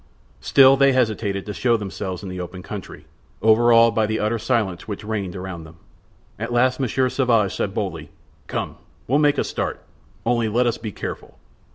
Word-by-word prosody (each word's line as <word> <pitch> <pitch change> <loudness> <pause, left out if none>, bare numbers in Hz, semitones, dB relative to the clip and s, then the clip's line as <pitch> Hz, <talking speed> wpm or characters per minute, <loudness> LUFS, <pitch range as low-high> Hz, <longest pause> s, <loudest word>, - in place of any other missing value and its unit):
Still, 135 0 +6
they 140 0 +5
hesitated 110 -5 0
to 105 - -5
show 120 +2 +2
themselves 95 -2 -5
in 95 - -6
the 90 0 -6
open 90 +1 -7
country, 100 -1 -8 0.4
overawed 115 +1 +5
by 110 -1 +1
the 110 +1 -1
utter 110 +2 0
silence 110 -7 -1
which 105 0 -5
reigned 105 -4 -3
around 90 -3 -6
them. 80 +1 -14 0.6
At 115 +3 -4
last 125 +2 +2
Monsieur 130 0 +1
Sauvage 120 -7 +1
said - - -2
boldly: - - -4 0.4
"Come, - - -4 0.3
we'll 140 +5 +3
make 145 -1 +3
a - - +2
start; - - -4 0.4
only 120 -1 +1
let 120 +4 +2
us 120 -1 0
be 110 -2 -5
careful!" - - -7
110 Hz, 180 wpm, -22 LUFS, 100-120 Hz, 0.6 s, Still